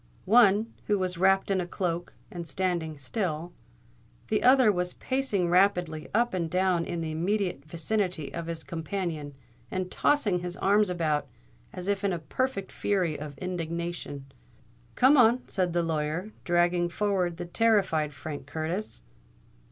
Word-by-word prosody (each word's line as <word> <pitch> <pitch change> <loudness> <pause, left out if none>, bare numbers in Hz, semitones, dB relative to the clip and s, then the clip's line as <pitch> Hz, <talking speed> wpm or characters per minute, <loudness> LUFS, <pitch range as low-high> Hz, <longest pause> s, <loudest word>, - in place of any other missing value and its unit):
One, 220 0 +5
who 210 - +3
was 185 -2 -2
wrapped 195 +1 +3
in 190 -1 +2
a 175 - -4
cloak, 175 -1 -3 0.2
was 170 -2 -6
standing 170 -5 -1
still; 165 - -3 0.8
the 215 - +1
other 255 -3 +6
was 180 -2 -2
pacing 260 -9 0
rapidly 180 -3 +2
up 235 +1 +2
and 170 -3 -1
down 180 -1 +1
in 170 -1 -3
the 160 -1 -3
immediate 180 -2 -1
vicinity 170 0 -2
of 170 -1 -5
his 165 -1 -5
companion, 160 -3 -4 0.3
and 185 -1 -3
tossing 215 -11 +2
his 180 +1 -5
arms 205 +1 +3
about 155 -5 0 0.4
as 180 0 -7
if 200 0 0
in 200 -2 +1
a - - -1
perfect 200 +4 -2
fury 185 -6 0
of 145 -1 -7
indignation. 170 -5 -4 0.7
"Come 270 +4 +6
on," 245 0 +4
said 185 -2 0
the 175 0 +1
lawyer, 160 +5 -2
dragging 175 0 +2
forward 185 -3 0
the 175 - -5
terrified 190 -6 +2
Frank 145 -1 -7
Curtis. 160 - -3
180 Hz, 150 wpm, -28 LUFS, 165-200 Hz, 0.8 s, other